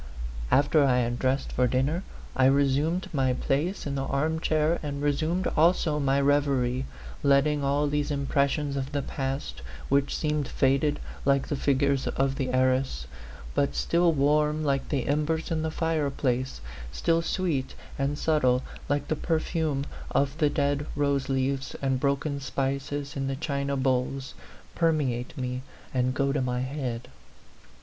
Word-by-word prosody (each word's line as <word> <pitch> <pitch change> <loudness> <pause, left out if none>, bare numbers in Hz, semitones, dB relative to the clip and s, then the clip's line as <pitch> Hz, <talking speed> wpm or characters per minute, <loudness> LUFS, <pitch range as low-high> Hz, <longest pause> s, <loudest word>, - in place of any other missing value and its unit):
After 145 +2 +4
I 130 -2 +3
had 120 0 0
dressed 130 +1 0
for 125 0 +2
dinner, 135 +8 +1 0.3
I 130 - +4
resumed 140 +6 +2
my 130 -3 +2
place 150 +9 -1
in 140 - -2
the 135 -1 -2
arm 155 +4 0
chair 155 +1 +1
and 145 -2 -4
resumed 155 +5 0
also 160 -1 +3
my 140 -1 +2
reverie, 140 -3 +2 0.3
letting 140 +1 +3
all 140 +2 +2
these 145 0 0
impressions 140 0 0
of 135 +1 -3
the 140 -1 0
past 135 - -4 0.3
which 140 0 +2
seemed 150 -3 0
faded 140 +2 +2 0.2
like 140 -1 +2
the 145 - 0
fig 135 0 +1
ures 140 -1 +2
in 135 0 +1
the 130 -1 -2
arras, 130 - +1 0.5
but 140 - +1
still 170 0 +3
warm 150 +1 +2
like 140 -2 0
the 135 -4 0
em 150 +2 +2
bers 160 +2 -2
in 160 -1 0
the 160 - -1
fireplace, 140 - -1 0.3
still 165 - +1
sweet 165 -6 -1 0.2
and 140 +1 0
subtle 130 -6 +2 0.3
like 145 0 0
the 155 - 0
perfume 155 -3 -1 0.2
of 140 0 +1
the 150 - +4
dead 145 0 0
rose 140 -2 0
leaves 135 0 -1
and 135 -2 0
broken 140 +1 0
spices 140 +1 -2
in 135 -1 -2
the 135 - -1
china 140 -1 -2
bowls 130 +1 0 0.4
permeate 145 -8 0
me 125 0 -3 0.3
and 130 0 +1
go 140 0 +1
to 140 -1 0
my 125 -1 -1
head. 130 -3 -4
140 Hz, 155 wpm, -27 LUFS, 135-150 Hz, 0.5 s, After